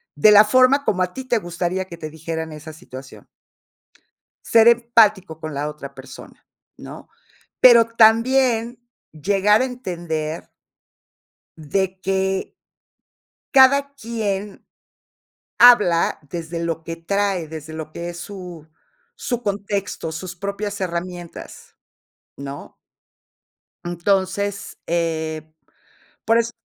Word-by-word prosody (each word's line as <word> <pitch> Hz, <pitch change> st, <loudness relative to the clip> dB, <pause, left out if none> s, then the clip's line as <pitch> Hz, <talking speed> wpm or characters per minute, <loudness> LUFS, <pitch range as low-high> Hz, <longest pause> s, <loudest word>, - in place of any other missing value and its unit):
de 215 Hz, -, +6 dB
la 210 Hz, 0 st, +9 dB
forma 255 Hz, +5 st, +4 dB
como 185 Hz, -8 st, 0 dB
a 180 Hz, 0 st, -1 dB
ti 265 Hz, -, -6 dB
te 245 Hz, -2 st, 0 dB
gustaría 175 Hz, 0 st, -3 dB
que 175 Hz, -, -10 dB
te 155 Hz, -2 st, -7 dB
dijeran 160 Hz, +1 st, -6 dB
esa 155 Hz, +1 st, -10 dB
situación. 130 Hz, -3 st, -12 dB, 1.2 s
Ser 230 Hz, 0 st, +6 dB
empático 220 Hz, -8 st, +3 dB
con 155 Hz, -2 st, -6 dB
la 145 Hz, +2 st, -2 dB
otra 150 Hz, -2 st, -9 dB
persona, -, -, -13 dB, 0.3 s
¿no? -, -, -11 dB, 0.5 s
Pero, 235 Hz, -2 st, +8 dB
también 230 Hz, +1 st, +3 dB, 0.3 s
llegar 200 Hz, +6 st, +2 dB
a -, -, +2 dB
entender 170 Hz, -10 st, -5 dB, 1.1 s
de 185 Hz, +6 st, -1 dB
que 190 Hz, 0 st, -1 dB, 1.0 s
cada 280 Hz, +1 st, +5 dB
quien 210 Hz, -5 st, -4 dB, 0.9 s
habla 210 Hz, -9 st, +5 dB
desde 170 Hz, +1 st, -5 dB
lo 165 Hz, -1 st, -3 dB
que 165 Hz, +1 st, -6 dB
trae, 190 Hz, 0 st, -1 dB
desde 160 Hz, 0 st, -9 dB
lo 155 Hz, -1 st, -7 dB
que 170 Hz, +2 st, -6 dB
es 175 Hz, -, -8 dB
su 180 Hz, -4 st, -9 dB, 0.5 s
su 245 Hz, -1 st, -3 dB
contexto, 200 Hz, -4 st, -3 dB
sus 175 Hz, +1 st, -7 dB
propias 200 Hz, +1 st, -4 dB
herramientas, 175 Hz, -1 st, -7 dB, 0.6 s
¿no? 140 Hz, 0 st, -9 dB, 1.1 s
Entonces, 195 Hz, +3 st, -2 dB
eh, 160 Hz, -2 st, -2 dB, 0.8 s
por 225 Hz, +1 st, +4 dB
eso 235 Hz, 0 st, 0 dB
190 Hz, 110 wpm, -21 LUFS, 165-220 Hz, 1.2 s, la